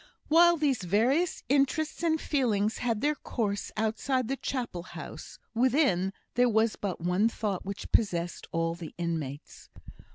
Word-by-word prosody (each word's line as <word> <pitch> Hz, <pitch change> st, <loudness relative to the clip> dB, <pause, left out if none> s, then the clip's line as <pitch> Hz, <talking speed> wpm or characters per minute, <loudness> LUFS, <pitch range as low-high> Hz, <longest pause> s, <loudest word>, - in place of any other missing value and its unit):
While 340 Hz, +2 st, +6 dB
these 285 Hz, -6 st, +1 dB
various 240 Hz, -, +1 dB
interests 285 Hz, +4 st, +1 dB
and 320 Hz, -2 st, +2 dB
feelings 225 Hz, -9 st, 0 dB
had 230 Hz, -3 st, -1 dB
their 295 Hz, +2 st, +2 dB
course 210 Hz, -8 st, -3 dB
outside 230 Hz, +3 st, 0 dB
the 270 Hz, -, 0 dB
Chapel 245 Hz, -10 st, -3 dB
house, 180 Hz, -, -9 dB, 0.2 s
within 235 Hz, -, +2 dB, 0.2 s
there 245 Hz, 0 st, +4 dB
was 220 Hz, 0 st, +2 dB
but 190 Hz, -4 st, -4 dB
one 180 Hz, +6 st, +2 dB
thought 205 Hz, -5 st, -3 dB
which 200 Hz, 0 st, -6 dB
possessed 175 Hz, -5 st, 0 dB
all 165 Hz, 0 st, 0 dB
the 170 Hz, -2 st, -9 dB
inmates. 160 Hz, -4 st, -5 dB
225 Hz, 140 wpm, -29 LUFS, 180-275 Hz, 0.2 s, While